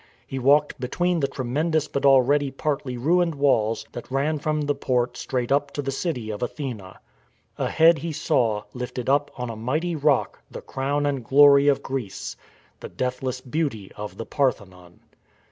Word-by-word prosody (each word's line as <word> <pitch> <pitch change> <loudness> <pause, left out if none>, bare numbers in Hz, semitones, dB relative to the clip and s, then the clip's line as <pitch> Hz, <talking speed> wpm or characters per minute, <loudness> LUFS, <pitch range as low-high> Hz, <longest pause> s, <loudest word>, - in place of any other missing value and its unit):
He 135 - -5
walked 145 +3 +3
between 175 +7 0
the 140 - +1
tremendous 150 +4 -1
but 140 -1 0
already 135 +2 +4
partly 135 -2 -3
ruined 170 +5 +2
walls 115 -6 +1
that 120 - -8
ran 145 +3 0
from 155 +1 -1
the 145 0 0
port 125 -3 -1
straight 125 -2 -3
up 140 0 +2
to 145 - -3
the 135 - -2
city 130 -7 -3
of 105 - -6
Athene. 125 -3 -4 0.8
Ahead 160 -1 +4
he 165 +3 -4
saw, 115 -8 0
lifted 125 0 -5
up 145 +1 +2
on 125 -2 -4
a - - -7
mighty 155 +10 -2
rock, 145 -2 +1
the - - -8
crown 140 +2 -2
and 140 -3 -1
glory 140 +2 +6
of 140 -2 +3
Greece, 125 -8 -5 0.2
— - - -34
the - - -8
deathless 130 0 -3
beauty 130 -7 -3
of 105 0 -7
the 115 - -5
Parthenon. 95 - -3
135 Hz, 170 wpm, -24 LUFS, 125-145 Hz, 0.8 s, glory